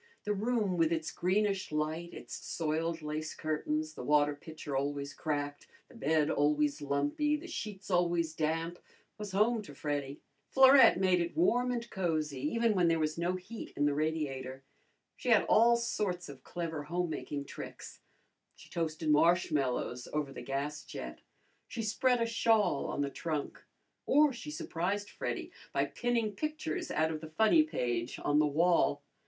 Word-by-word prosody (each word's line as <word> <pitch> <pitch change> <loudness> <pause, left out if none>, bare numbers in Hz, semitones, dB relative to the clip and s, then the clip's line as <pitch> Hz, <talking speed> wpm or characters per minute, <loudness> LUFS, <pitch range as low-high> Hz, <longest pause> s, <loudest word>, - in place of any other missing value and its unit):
The 210 - 0
room 210 -3 0
with 165 -1 +3
its 160 -1 -1
greenish 195 +1 0
light, 155 +3 -2
its - - -9
soiled 160 0 -2
lace 155 +1 -4
curtains, 155 0 -2
the - - -8
water 145 +2 +3
pitcher 145 -1 -7
always 140 +1 -2
cracked, 145 -2 -3 0.2
the - - -16
bed 155 +1 +1
always 150 0 +2
lumpy, 145 - +1
the 305 +3 -7
sheets 210 - -6
always 170 -2 +2
damp, 165 +2 -1 0.4
was 210 -2 -5
home 215 +4 +2
to 145 -9 -11
Freddy. 145 -1 -3 0.3
Florette 265 -6 +7
made 185 -2 +3
it 170 - -3
warm 250 -7 +3
and 240 -1 -2
cozy 155 -7 -1
even 230 - +1
when 180 -3 +3
there 165 0 +3
was 155 +1 -1
no 175 +2 0
heat 205 +5 -8
in 145 - +1
the 145 - +2
radiator. 140 -4 -2 0.5
She 250 - -3
had 225 -3 +6
all 235 +2 +5
sorts 200 -6 -2
of 140 -2 -10
clever 165 -3 -4
home 175 0 -1
making 145 -2 -4
tricks. - - -9 0.6
She - - -16
toasted 160 -2 -1
marshmallows 150 -6 +2
over 150 -2 -2
the - - -7
gas 140 +4 -3
jet; 60 0 -8 0.5
she 225 - -4
spread 245 +3 +2
a 230 - +2
shawl 225 -8 +2
on - - -2
the 140 -1 -1
trunk; 155 0 -4 0.4
or 295 0 +5
she 235 - -8
surprised 180 +7 -3
Freddy - - -4 0.2
by - - +1
pinning 235 -3 -1
pictures 300 - -3
out 160 +1 +1
of 155 -1 -5
the 160 - -8
funny 220 - +5
page 120 - -2
on 145 0 +3
the 150 - +4
wall. 155 -1 +2
160 Hz, 165 wpm, -32 LUFS, 150-205 Hz, 0.6 s, Florette